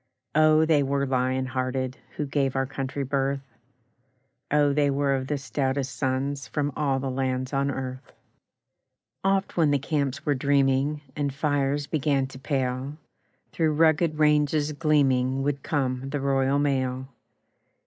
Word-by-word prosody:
Oh, 155 0 +5
they 155 -2 +3
were 140 0 0
lion 130 0 0
hearted 130 0 -2 0.2
Who 150 - -1
gave 135 -1 0
our 135 0 +1
country 135 +1 -4
birth! 135 0 -1 1.1
Oh, 145 -1 +3
they 145 0 +2
were 140 0 +1
of 130 -1 -2
the 145 - -1
stoutest 135 -1 -2
sons 135 -1 -2
From 145 +5 -1
all 140 -3 0
the 135 0 -3
lands 130 0 -2
on 140 0 +1
earth! 130 -1 -5 1.1
Oft 195 -1 0
when 160 -3 +4
the 145 - +3
camps 140 -1 -2
were 145 - +2
dreaming, 140 +1 +1
And 145 -2 -1
fires 145 0 0
began 140 -3 0
to 130 - -11
pale, 135 0 -2 0.5
Through 155 -2 +1
rugged 160 0 +3
ranges 150 0 +2
gleaming 135 -4 +2
Would 140 -1 -1
come 135 -3 -2
the 145 +1 -2
Royal 135 0 +1
Mail. 130 -2 0
140 Hz, 145 wpm, -26 LUFS, 130-145 Hz, 1.1 s, Oh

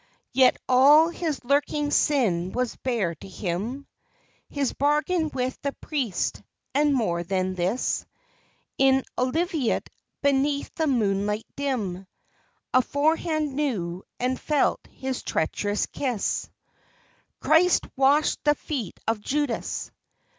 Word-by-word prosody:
Yet 260 -1 +5
all 290 +6 +7
his 325 -5 -3
lurking 290 +2 +1
sin 190 - +2
was 250 -1 -1
bare 225 -10 -1
to 165 - -12
him, 205 +9 -4 0.6
His 280 -3 -1
bargain 300 +3 +1
with 255 0 -3
the 280 -1 -2
priest, 260 - -2 0.3
and 295 +2 +3
more 175 -9 0
than 185 +1 -1
this, 185 +7 -1 0.7
In 265 0 +4
Olivet, 300 - 0 0.3
beneath 280 +1 +1
the 320 - 0
moonlight 210 -4 0
dim, 210 -10 -2 0.7
Aforehand 300 +3 +1
knew 195 -12 -2 0.2
and 255 +1 0
felt 300 -2 +2
his 265 -1 -4
treacherous 205 +6 -1
kiss. 250 -7 -2 0.9
Christ 340 +3 +4
washed 280 +3 +3
the 295 0 +4
feet 265 - -5
of 225 -1 0
Judas! 285 +1 -2
265 Hz, 110 wpm, -25 LUFS, 210-295 Hz, 0.9 s, all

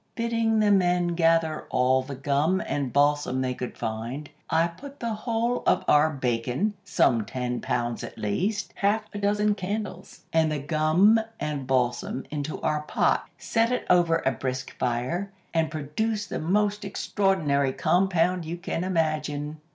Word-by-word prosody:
"Bidding 230 -2 +1
the 210 -1 +4
men 180 -2 +3
gather 165 -2 +2
all 130 +1 +3
the 135 +1 -7
gum 145 +7 +1
and 140 -3 -2
balsam 145 -2 +2
they 130 -1 -1
could 125 -1 -6
find, 115 +6 -4 0.2
I 165 - +3
put 275 +12 -9
the 230 -1 -2
whole 230 +2 -1
of - - +3
our 150 +1 +5
bacon, 130 - -1
some 130 - +2
ten 125 +2 -3
pounds 120 0 -2
at - - -8
least, 190 - -1
half 205 +2 +2
a 205 - -4
dozen 210 +1 +2
candles, 200 -1 -5
and 160 -1 +3
the 150 - -1
gum 155 +9 +3 0.2
and 150 -3 -3
balsam 125 0 0
into 150 0 -3
our 150 -1 0
pot, 150 - 0
set 230 +1 +1
it 250 - -1
over 170 -2 +3
a 130 - +4
brisk 130 +2 -4
fire, 130 +11 -1 0.2
and 165 -2 +1
produced 205 +9 -2
the - - -2
most 205 +5 +1
extraordinary 185 -9 +1
compound 180 +3 +2
you 165 +2 -5
can 175 -1 -3
imagine. 155 -4 -1
160 Hz, 155 wpm, -26 LUFS, 135-200 Hz, 0.2 s, our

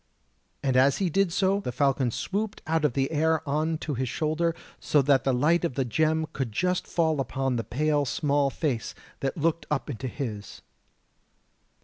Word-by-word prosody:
As 130 0 +4
he 185 -4 0
did 195 +1 +2
so 195 +3 +2
the 160 - -4
falcon 135 0 +1
swooped 205 - -3
out 160 +1 0
of 150 -5 +2
the 135 +2 0
air 160 0 +1
on 155 +3 0
to 150 - -2
his 130 -1 -2
shoulder, 160 +4 0 0.2
so 150 - +2
that 135 -3 +3
the 135 - +3
light 155 +8 +2
of 165 -7 -1
the 135 - 0
gem 160 +5 +1
could 130 -4 -3
just 180 +10 0
fall 160 -3 +1
upon 135 0 -1
the 115 - -1
pale 150 +4 +1
small 140 +1 +1
face 135 -5 -2 0.2
that 135 +3 -2
looked 165 +1 0
up 150 0 -1
into 130 +1 -5
his. 110 -5 -6
145 Hz, 175 wpm, -27 LUFS, 135-160 Hz, 0.2 s, As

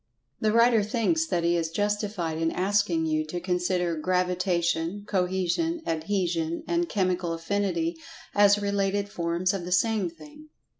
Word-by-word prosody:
The 215 - +2
writer 230 0 +5
thinks 250 +10 0
that 175 - 0
he 170 +1 +2
is 165 -1 0
justified 205 -3 -2
in 165 0 +1
asking 185 -3 +1
you 155 -1 0
to 175 +3 -4
consider 180 -1 0
Gravitation, 180 +1 0
Cohesion, 190 - 0
Adhesion 165 -1 -1
and 345 0 0
Chemical 185 -3 0
Affinity 170 -1 -1 0.4
as 205 0 +5
related 200 0 0
forms 170 +1 -1
of 195 -3 -3
the 180 - -6
same 205 0 +2
thing. 165 - -15
185 Hz, 140 wpm, -26 LUFS, 170-205 Hz, 0.4 s, writer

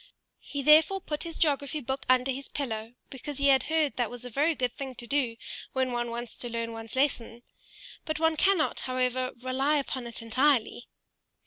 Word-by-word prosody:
He 285 -1 -5
therefore 315 +7 +6
put 300 -5 -4
his 330 -1 -6
geography 290 -1 +1
book 265 0 -4
under 255 +1 +4
his 270 +1 -5
pillow, 225 -4 -4 0.2
because 275 +1 -6
he 280 0 +3
had 265 -1 +6
heard 315 -3 +1
that 240 -3 +1
was 245 0 -9
a 250 - -7
very 300 +7 +2
good 250 -3 -1
thing 265 -2 -6
to 240 - -4
do 240 -2 0 0.4
when 260 -1 0
one 240 0 -1
wants 235 0 -5
to 240 - -4
learn 230 0 -3
one's 225 0 -8
lesson; 240 -4 0 0.6
but 310 -1 -3
one 320 0 +3
cannot, 375 0 +2
however, 255 0 0
rely 270 +4 +1
upon 260 -3 -3
it 235 0 -4
entirely. 245 0 +2
260 Hz, 190 wpm, -28 LUFS, 240-290 Hz, 0.6 s, therefore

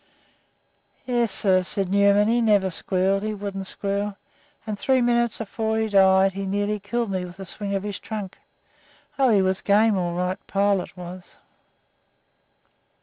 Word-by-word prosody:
"Yes, 240 -4 0
sir," 185 -2 +2
said 195 +1 0
Newman; 200 +1 +4
"he 235 +2 +2
never 205 -4 +2
squealed, 190 +3 0
he 215 0 -3
wouldn't 195 -1 -5
squeal, 200 +1 -1 0.5
and 210 -2 -5
three 265 -1 +2
minutes 240 -1 +1
before 220 0 -3
he 220 0 0
died 190 -1 +4
he 195 0 -4
nearly 205 +2 -1
killed 230 +2 -3
me 185 -1 -2
with 180 +1 -10
a 195 - -7
swing 200 +2 -1
of 195 - -2
his 205 -2 -5
trunk. 210 -4 -7 0.8
Oh, 265 -2 +4
he 205 -4 +4
was 190 0 0
game 210 +1 +3
all 175 -1 -2
right, 180 +1 -2
Pilot 200 -2 0
was." 180 +1 -10
200 Hz, 155 wpm, -23 LUFS, 190-215 Hz, 0.8 s, Newman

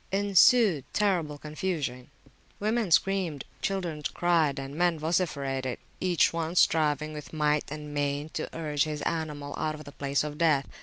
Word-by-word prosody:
Ensued 200 - +5
terrible 175 -8 +1
confusion; 150 -5 -4 0.5
women 215 0 0
screamed, 170 -4 +1 0.2
children 175 -6 -2
cried, 165 -5 +2
and 135 0 -5
men 175 0 +2
vociferated, 140 -6 -1 0.2
each 180 -3 +2
one 165 +1 -2
striving 155 -3 +2
with 150 -1 -8
might 150 -1 +1
and 150 -1 -6
main 145 +1 -1
to 155 - -4
urge 150 -3 0
his 150 -1 -4
animal 150 -3 -3
out 155 0 -1
of 155 - -10
the 145 - -11
place 140 0 -1
of 150 0 -6
death. 150 -5 +3
155 Hz, 150 wpm, -28 LUFS, 145-175 Hz, 0.5 s, Ensued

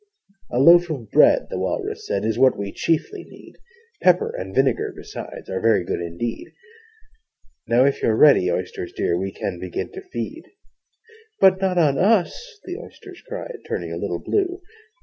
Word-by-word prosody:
'A 120 - -3
loaf 175 +5 +6
of 125 -9 -6
bread,' - - +5
the - - -3
Walrus - - -3
said, 100 +1 -1
'Is 110 +1 -1
what 130 0 +4
we 100 -1 -4
chiefly 270 - -1
need: - - -15 0.5
Pepper 180 -1 +3
and 95 +1 -6
vinegar 135 -2 +1
besides - - -9
Are 95 0 -3
very 110 -5 +3
good 85 - -3
indeed 85 +8 -5 1.1
Now, 120 +3 +4
if 140 - 0
you're 110 - +2
ready, 110 -9 +5
Oysters 90 0 -4
dear, 85 - 0
We 95 +2 -3
can 90 -2 -5
begin 90 -1 -5
to 385 - -8
feed.' 375 -2 -7 0.9
'But 190 0 +5
not 185 -2 0
on 150 -5 +3
us!' 225 - +1
the 360 - -6
Oysters - - -13
cried, - - -7
Turning - - -4
a - - -4
little - - -3
blue. 375 -2 -2
135 Hz, 170 wpm, -22 LUFS, -, 1.1 s, loaf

